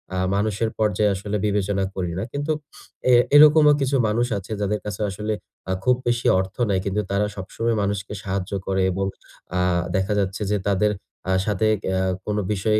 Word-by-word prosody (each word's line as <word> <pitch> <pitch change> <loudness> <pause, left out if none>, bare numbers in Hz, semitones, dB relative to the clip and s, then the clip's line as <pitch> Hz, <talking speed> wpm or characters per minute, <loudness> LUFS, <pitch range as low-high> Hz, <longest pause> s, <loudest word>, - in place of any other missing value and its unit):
আ - - -1 0.2
মানুষের 110 +2 0
পর্যায়ে 105 -1 +2
আসলে 105 +2 -3
বিবেচনা 100 -1 0
করি 90 -3 -2
না। - - -2
কিন্তু 145 +2 -2 0.5
অ্যা 125 -1 +6 0.2
এরকমও 150 0 +8
কিছু 135 +1 +1
মানুষ 115 +3 +1
আছে, 100 +2 -8
যাদের 105 +1 0
কাছে 105 0 -5
আসলে 105 +3 -3 0.5
খুব 125 0 +4
বেশি 120 0 +1
অর্থ 95 +1 -4
নাই। 95 -2 +2
কিন্তু 100 +2 0
তারা 100 +1 +2
সবসময় 115 +4 -2
মানুষকে 100 0 -2
সাহায্য 95 -1 -3 0.2
করে 95 0 +1
এবং 95 +2 -1 0.5
আ - - +2 0.4
দেখা 95 +2 +1
যাচ্ছে 95 +1 -2
যে, 105 - +2
তাদের 100 +2 +2 0.4
আ - - +2
সাথে 105 +1 +1 0.2
অ্যা 95 0 +1 0.2
কোন 105 0 -1
বিষয়ে 105 +1 +1
105 Hz, 175 wpm, -23 LUFS, 95-110 Hz, 0.5 s, এরকমও